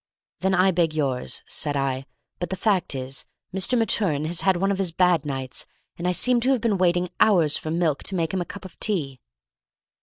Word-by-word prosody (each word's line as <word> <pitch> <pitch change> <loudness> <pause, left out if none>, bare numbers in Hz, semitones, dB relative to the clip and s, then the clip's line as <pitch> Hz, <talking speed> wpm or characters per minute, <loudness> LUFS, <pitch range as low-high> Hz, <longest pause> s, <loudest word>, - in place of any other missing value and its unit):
"Then 190 +2 +1
I 190 +1 +4
beg 170 -3 +1
yours," 135 -5 -1
said 145 -2 -2
I; 135 0 -2 0.3
"but 175 - -3
the 190 - -2
fact 190 -6 +1
is, 130 +1 -4 0.3
Mr. 195 +6 +1
Maturin 190 -9 +1
has 165 +1 0
had 190 -2 +3
one 195 +2 +1
of 195 - -2
his 185 -3 0
bad 175 -2 +2
nights, 135 -2 -5 0.3
and 175 - -3
I - - +3
seem 245 +7 +2
to 255 - +1
have 265 -2 +3
been 215 -5 +1
waiting 175 0 +2
hours 170 -9 +4
for 155 - -4
milk 160 -3 0
to 195 - +1
make 165 -2 -1
him 190 - 0
a - - -3
cup 200 - -9
of 185 - -12
tea." 145 -11 -1
175 Hz, 215 wpm, -24 LUFS, 150-190 Hz, 0.3 s, I